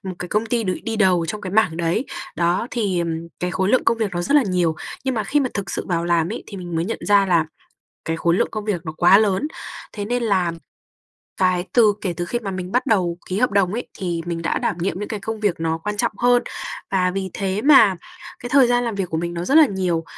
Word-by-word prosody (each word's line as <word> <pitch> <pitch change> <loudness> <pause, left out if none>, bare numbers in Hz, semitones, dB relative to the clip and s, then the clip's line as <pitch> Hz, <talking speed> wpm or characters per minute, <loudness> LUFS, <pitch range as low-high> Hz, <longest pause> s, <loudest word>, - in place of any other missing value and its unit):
một 190 -2 -5
cái 180 - -6
công 215 +2 0
ty 230 -1 0
được 185 -1 0
đi 225 -1 -3
đầu 180 -5 +3
trong 210 +6 -4
cái 185 - -5
mảng 185 -7 +2
đấy. 170 +8 0 0.3
Đó, 175 +6 +1
thì, 200 -7 -1
ừm, 165 0 -3
cái 180 - -1
khối 190 +1 0
lượng 255 - +3
công 230 0 +2
việc 215 -3 0
nó 175 - -1
rất 280 - 0
là 290 - +6
nhiều, 180 -5 +1 0.3
nhưng 260 -1 0
mà 220 - -1
khi 290 +8 +1
mà 260 - 0
thực 195 -3 -3
sự - - -4
vào 170 -2 -1
làm 170 -1 +1
ấy - - -5
thì 200 - -9
mình 175 -2 -5
mới 165 - 0
nhận 225 - -3
ra 200 -1 +5
là 170 -4 +2 0.6
cái 165 0 -2
khối 170 +1 +2
lượng - - +2
công 215 -1 -5
việc 190 -6 -1
nó 155 - -3
quá 180 +3 +7
lớn. 210 +5 +1 0.5
Thế 205 -2 -4
nên 245 +2 -1
làm 180 -6 +1 0.8
cái 185 -1 +1
từ 220 -4 +5
kể 185 -3 -2
từ 175 - -2
khi 175 +8 -2
mà 215 -4 -5
mình 185 0 -5
bắt 250 +3 +1
đầu 180 -7 +1
ký 185 - -2
hợp 250 +3 +2
đồng 195 -2 +2
ấy 240 +3 -3
thì 175 -3 -2
mình 170 -1 -3
đã - - 0
đảm - - -1
nhiệm 180 +1 -2
những 210 - -5
cái 215 -3 -4
công 220 +1 -5
việc 200 -6 0
nó 160 0 -1
quan 210 +5 -4
trọng - - 0
hơn, 245 0 +4 0.5
và 180 -2 +2
vì 190 0 -3
thế 195 +1 -2
mà 265 -9 +7 0.4
cái 245 - -7
thời 275 -1 +6
gian 245 0 +2
làm 230 - -2
việc 195 -3 -3
của 160 - -1
mình 170 +1 -3
nó 170 - -3
rất 275 - 0
là 315 - +8
nhiều. 180 -6 -1
190 Hz, 270 wpm, -21 LUFS, 175-220 Hz, 0.8 s, là